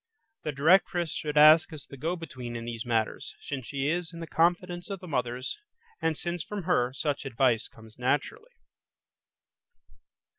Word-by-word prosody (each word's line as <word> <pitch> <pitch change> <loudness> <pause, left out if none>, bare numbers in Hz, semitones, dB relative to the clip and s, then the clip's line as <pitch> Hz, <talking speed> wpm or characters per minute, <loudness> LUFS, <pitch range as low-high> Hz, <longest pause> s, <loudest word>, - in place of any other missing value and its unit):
The 150 - -2
directress 170 +3 +3
should 150 -1 -3
act 155 +4 +8
as 150 -3 -9
the 140 - -11
go 160 +7 -2
between 130 -8 -7
in 115 0 -5
these 115 0 -5
matters, 115 -2 -1
since 135 -4 -6
she 140 -1 -2
is 170 +2 -1
in 170 - -9
the 165 - -5
confidence 175 +2 +1
of 195 -2 -4
the 180 - -10
mothers, 125 - -2 0.4
and 160 -2 +1
since 175 -1 -3
from 205 +1 -5
her, 130 -8 +2
such 140 +2 -2
advice 125 -3 +1
comes 115 -2 -17
naturally. 145 - -1
150 Hz, 160 wpm, -28 LUFS, 125-175 Hz, 0.4 s, act